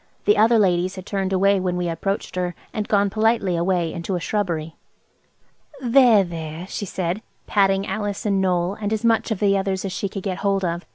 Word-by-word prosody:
The 415 Hz, -, +5 dB
other 230 Hz, +1 st, +5 dB
ladies 185 Hz, -2 st, +2 dB
had 185 Hz, -1 st, -8 dB
turned 195 Hz, -2 st, -2 dB
away 195 Hz, +1 st, +3 dB
when 180 Hz, -1 st, -1 dB
we 175 Hz, -1 st, -1 dB
approached 190 Hz, +5 st, -3 dB
her, 180 Hz, -1 st, -2 dB, 0.2 s
and 210 Hz, -1 st, -3 dB
gone 200 Hz, -1 st, +2 dB
politely 215 Hz, -3 st, +1 dB
away 170 Hz, -1 st, 0 dB
into 170 Hz, +2 st, -3 dB
a -, -, -1 dB
shrubbery. 170 Hz, -5 st, -2 dB, 1.0 s
"There, 245 Hz, -4 st, +5 dB
there," 165 Hz, -1 st, -6 dB
she 200 Hz, +1 st, -5 dB
said, 180 Hz, +3 st, -2 dB, 0.2 s
patting 195 Hz, -1 st, +2 dB
Alice 205 Hz, -1 st, -3 dB
and 195 Hz, -2 st, +1 dB
Noël 180 Hz, 0 st, 0 dB
and 205 Hz, 0 st, -2 dB
as 220 Hz, +1 st, -1 dB
much 230 Hz, 0 st, +2 dB
of 220 Hz, -4 st, -2 dB
the 200 Hz, -1 st, +3 dB
others 195 Hz, 0 st, -1 dB
as 195 Hz, -, -3 dB
she 200 Hz, -, -3 dB
could 195 Hz, -1 st, -6 dB
get 190 Hz, -2 st, -3 dB
hold 195 Hz, -1 st, 0 dB
of. 170 Hz, +1 st, -3 dB
195 Hz, 205 wpm, -22 LUFS, 180-205 Hz, 1.0 s, The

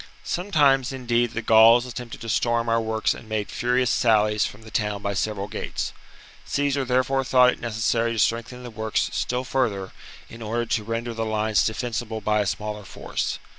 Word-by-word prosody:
Sometimes, 145 Hz, -9 st, +2 dB
indeed, 120 Hz, -2 st, 0 dB
the 115 Hz, -, -3 dB
Gauls 115 Hz, +2 st, +6 dB
attempted 125 Hz, -1 st, -8 dB
to 115 Hz, -, -6 dB
storm 120 Hz, +1 st, +1 dB
our 115 Hz, 0 st, +2 dB
works 110 Hz, 0 st, 0 dB
and 110 Hz, -, -12 dB
made 110 Hz, -2 st, -2 dB
furious 125 Hz, 0 st, +1 dB
sallies 105 Hz, -3 st, +3 dB
from 105 Hz, +2 st, -12 dB
the 110 Hz, -, -13 dB
town 105 Hz, -2 st, -2 dB
by 100 Hz, -, -1 dB
several 100 Hz, 0 st, -2 dB
gates. 105 Hz, -, -4 dB, 0.5 s
Caesar 145 Hz, -1 st, 0 dB
therefore 130 Hz, +1 st, +1 dB
thought 125 Hz, -1 st, +5 dB
it -, -, -8 dB
necessary 115 Hz, 0 st, 0 dB
to -, -, -5 dB
strengthen 115 Hz, +3 st, 0 dB
the 120 Hz, -, -8 dB
works 110 Hz, 0 st, -1 dB
still 125 Hz, +1 st, -1 dB
further, 120 Hz, -7 st, -1 dB, 0.4 s
in 115 Hz, -, -12 dB
order 115 Hz, +2 st, -2 dB
to 110 Hz, -1 st, -1 dB
render 115 Hz, +2 st, -3 dB
the 115 Hz, 0 st, -3 dB
lines 110 Hz, -1 st, +1 dB
defensible 110 Hz, -1 st, -3 dB
by 105 Hz, 0 st, +1 dB
a 100 Hz, -, -1 dB
smaller 105 Hz, +1 st, -4 dB
force. -, -, -4 dB
115 Hz, 180 wpm, -24 LUFS, 110-125 Hz, 0.5 s, Gauls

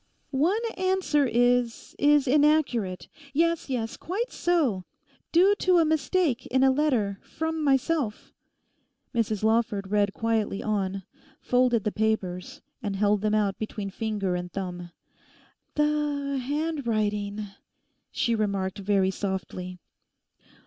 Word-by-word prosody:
'One 320 Hz, +10 st, +2 dB, 0.2 s
answer 370 Hz, -6 st, +2 dB
is—is 245 Hz, +4 st, +2 dB
inaccurate. 275 Hz, -, +2 dB, 0.3 s
'Yes, 335 Hz, +1 st, +1 dB
yes, 230 Hz, -4 st, -2 dB
quite 425 Hz, +9 st, -3 dB
so: 290 Hz, -, +1 dB, 0.5 s
due 370 Hz, +4 st, +5 dB
to 365 Hz, -1 st, +4 dB
a 330 Hz, -, +5 dB
mistake 310 Hz, -3 st, +1 dB
in 260 Hz, +1 st, +2 dB
a 265 Hz, -, +6 dB
letter 250 Hz, -9 st, +1 dB
from 320 Hz, 0 st, -3 dB
myself.' 275 Hz, -4 st, 0 dB, 0.8 s
Mrs 220 Hz, -3 st, -1 dB
Lawford 220 Hz, -3 st, +1 dB
read 205 Hz, -1 st, +2 dB
quietly 220 Hz, -2 st, -1 dB
on, 195 Hz, -2 st, -1 dB, 0.4 s
folded 245 Hz, -3 st, +2 dB
the 210 Hz, -, 0 dB
papers, 200 Hz, -5 st, -2 dB, 0.2 s
and 205 Hz, -4 st, -3 dB
held 205 Hz, 0 st, +2 dB
them 215 Hz, 0 st, +1 dB
out 205 Hz, -2 st, 0 dB
between 210 Hz, -2 st, -4 dB
finger 205 Hz, -4 st, -2 dB
and 180 Hz, 0 st, -4 dB
thumb. 180 Hz, -2 st, -5 dB, 0.9 s
'The—handwriting...' 280 Hz, -8 st, -1 dB, 0.6 s
she 235 Hz, -, 0 dB
remarked 200 Hz, -3 st, -1 dB
very 195 Hz, -1 st, +2 dB
softly. 185 Hz, -2 st, -4 dB
230 Hz, 110 wpm, -26 LUFS, 200-295 Hz, 0.9 s, a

